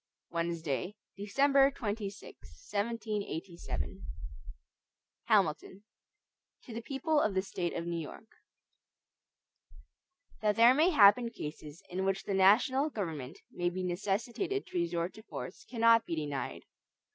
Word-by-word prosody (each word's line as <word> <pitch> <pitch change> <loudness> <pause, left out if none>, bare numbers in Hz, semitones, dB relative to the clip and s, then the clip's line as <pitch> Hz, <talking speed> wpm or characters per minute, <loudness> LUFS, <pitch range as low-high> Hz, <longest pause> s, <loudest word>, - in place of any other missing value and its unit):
Wednesday, 170 +1 -2 0.2
December 275 +7 +4
26, 210 -6 -4 0.5
1787 205 -5 -3 1.2
HAMILTON 195 -2 +1 0.8
To 235 - -10
the 230 - -4
People 290 +5 0
of 205 -7 0
the 190 - +2
State 175 -3 -3
of 170 - -3
New 170 -1 -2
York: 165 +7 -10 2.0
THAT 210 -1 +2
there 235 +2 +7
may 310 +6 +4
happen 230 - +6
cases 150 -6 -8
in 185 +2 -3
which 195 0 0
the 200 - -3
national 240 +9 +4
government 160 - -5
may 175 0 -1
be 185 +1 -4
necessitated 215 - -2
to 180 - -3
resort 170 +1 -1
to 220 - -12
force, 205 -3 -8
cannot 230 -1 +4
be 165 - -2
denied. 145 -3 -4
200 Hz, 120 wpm, -32 LUFS, 175-230 Hz, 2.0 s, there